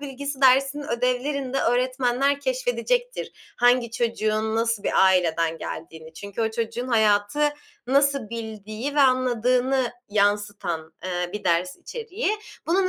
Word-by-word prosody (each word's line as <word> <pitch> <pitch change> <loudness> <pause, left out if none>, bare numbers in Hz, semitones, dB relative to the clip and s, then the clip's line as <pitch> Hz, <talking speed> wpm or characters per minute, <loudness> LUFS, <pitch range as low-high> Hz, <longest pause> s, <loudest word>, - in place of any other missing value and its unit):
bilgisi 280 0 -6
dersinin 270 +2 +4
ödevlerinde 255 +3 -1
öğretmenler 255 +3 +1
keşfedecektir - - -1 0.2
hangi 245 -1 +3
çocuğun 220 -2 -1
nasıl 230 -2 0
bir - - +3
aileden 165 -3 +2
geldiğini. 160 0 -8
Çünkü 200 +6 -5
o 220 - 0
çocuğun 230 +2 -3
hayatı 220 +5 +3 0.4
nasıl 275 -3 +2
bildiği 220 +3 -5
ve 295 - +3
anladığını 255 0 +2 0.2
yansıtan, 205 -6 0
eee, 180 -1 -2
bir 210 - -6
ders 180 +1 +1
içeriği. 460 -1 -4 0.4
Bunun 370 +3 +2
240 Hz, 115 wpm, -24 LUFS, 205-275 Hz, 0.4 s, dersinin